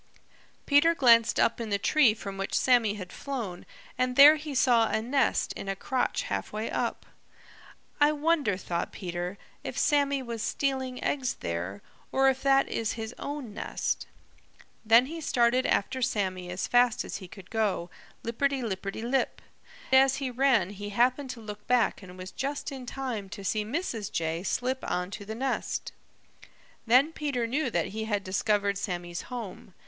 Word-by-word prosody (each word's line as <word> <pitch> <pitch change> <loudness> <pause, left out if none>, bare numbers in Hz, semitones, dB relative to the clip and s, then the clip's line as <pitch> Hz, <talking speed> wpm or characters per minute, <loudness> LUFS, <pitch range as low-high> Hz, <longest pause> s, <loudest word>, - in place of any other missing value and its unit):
Peter 325 +4 +5
glanced 230 -5 +5
up 235 - +2
in 225 - -4
the 200 - +1
tree 245 +1 +4
from 200 -2 -7
which 195 0 -2
Sammy 235 -5 +3
had 185 -4 -8
flown 235 -11 -5 0.3
and 255 0 +1
there 290 +3 +10
he 300 -2 -6
saw 240 -3 +4
a - - +1
nest 260 +5 +1
in 195 - -6
a 195 - -1
crotch 255 +6 -1
halfway 215 +1 -3
up. - - -2 0.9
"I 295 0 +5
wonder," 300 - +1
thought 175 -2 -3
Peter, 175 +1 -5 0.3
"if - - -5
Sammy 280 -2 +2
was 235 -2 -5
stealing 260 -1 -2
eggs 260 -3 -1
there, 90 +4 -4 0.3
or 270 0 +4
if 265 0 -1
that 275 0 +4
is 225 -1 -2
his 225 0 -6
own 280 -7 -5
nest." - - -3 0.8
Then 230 +3 +6
he 325 +4 -6
started 250 -2 +2
after 260 +6 0
Sammy 190 -7 -1
as 180 +1 -3
fast 245 0 +3
as - - -5
he 190 -2 -10
could 190 0 -13
go, 210 -6 -1 0.3
lipperty 265 +3 0
lipperty 195 0 -4
lip. 260 +3 0 0.5
As 265 0 +6
he 265 -2 -3
ran 245 -7 +2
he 205 0 -7
happened 255 +6 +1
to 235 - -6
look 210 -1 -9
back 250 -4 +2
and 185 -1 -12
was 185 0 -8
just 285 +3 -3
in 260 -2 -8
time 245 -7 -4
to 200 - -8
see 215 +2 0
Mrs. 225 - -3
Jay 165 0 -1
slip 255 +7 -1
on 180 +1 -2
to 205 - -7
the 220 +2 -5
nest. 265 +3 -2 1.0
Then 265 +7 +5
Peter 280 -7 -1
knew 265 +4 0
that 175 -7 -1
he 220 +2 -4
had 205 -2 -1
discovered 200 +1 0
Sammy's 175 -3 -4
home. 225 -6 -7
230 Hz, 170 wpm, -28 LUFS, 200-265 Hz, 1.0 s, there